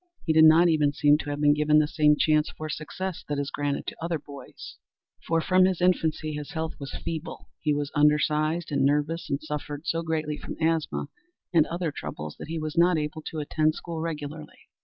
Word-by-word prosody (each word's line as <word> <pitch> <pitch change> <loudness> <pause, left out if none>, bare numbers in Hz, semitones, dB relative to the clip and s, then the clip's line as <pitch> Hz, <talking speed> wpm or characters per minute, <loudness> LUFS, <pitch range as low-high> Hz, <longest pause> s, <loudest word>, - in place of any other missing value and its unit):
He 160 - +2
did 160 0 +7
not 160 +3 +7
even 150 -3 +2
seem 145 0 +4
to 145 - -5
have 145 0 -3
been 145 0 +5
given 150 0 +3
the 155 -1 +4
same 150 -1 +3
chance 155 -1 +2
for 155 0 -7
success 175 +4 -5
that 145 - -1
is 140 0 -2
granted 145 -1 -2
to - - -7
other 170 -1 -1
boys, 140 -2 -11 0.5
for 165 0 +2
from 185 +2 +4
his 185 -2 0
infancy 160 -4 +1
his 150 -1 -6
health 160 0 -3
was 140 -1 -6
feeble, 165 0 -5
he 155 - 0
was 145 -1 -1
undersized, 150 +2 +2
and 140 -2 +1
nervous, 150 +4 0
and 140 - 0
suffered 150 0 -5
so 165 -1 0
greatly 155 -2 -2
from - - -7
asthma 160 -1 0 0.4
and 160 -2 +5
other 170 -2 -2
troubles 75 - -7
that - - -7
he 165 +1 -4
was 155 0 -4
not 175 0 +4
able 150 +1 -3
to 155 0 -5
attend 155 +1 +1
school 165 -2 -6
regularly. 155 -1 -7
155 Hz, 205 wpm, -26 LUFS, 150-165 Hz, 0.5 s, did